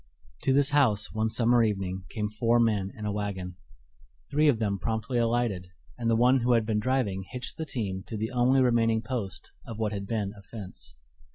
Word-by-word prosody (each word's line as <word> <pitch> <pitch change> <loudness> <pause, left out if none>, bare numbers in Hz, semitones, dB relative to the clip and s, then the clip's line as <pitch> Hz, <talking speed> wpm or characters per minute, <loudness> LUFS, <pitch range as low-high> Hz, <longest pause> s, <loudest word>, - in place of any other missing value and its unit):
To - - +1
this 140 +1 +4
house, 130 -8 +2
one 110 +1 0
summer 120 +1 +3
evening, 95 -4 -1
came 105 -2 -2
four 115 +3 +2
men 105 -4 +1
in 105 - -6
a 105 - -1
wagon. 95 -3 -4 0.7
Three 150 +2 +3
of 140 -6 +4
them 100 -3 -1
promptly 115 +3 -1
alighted, 115 -6 0 0.3
and 115 -2 -2
the 115 - +4
one 125 +3 +4
who 120 +1 +2
had 115 -2 +3
been 110 -1 0
driving 105 -5 0
hitched 125 0 -4
the 160 - -5
team 95 -8 -3
to 110 - -5
the 110 +4 -3
only 125 +2 +3
remaining 115 -2 +2
post 115 -6 -5
of 115 - -8
what 110 -2 -1
had 100 -2 -4
been 105 -3 -2
a 100 - -13
fence. 95 - -10
110 Hz, 200 wpm, -28 LUFS, 100-120 Hz, 0.7 s, this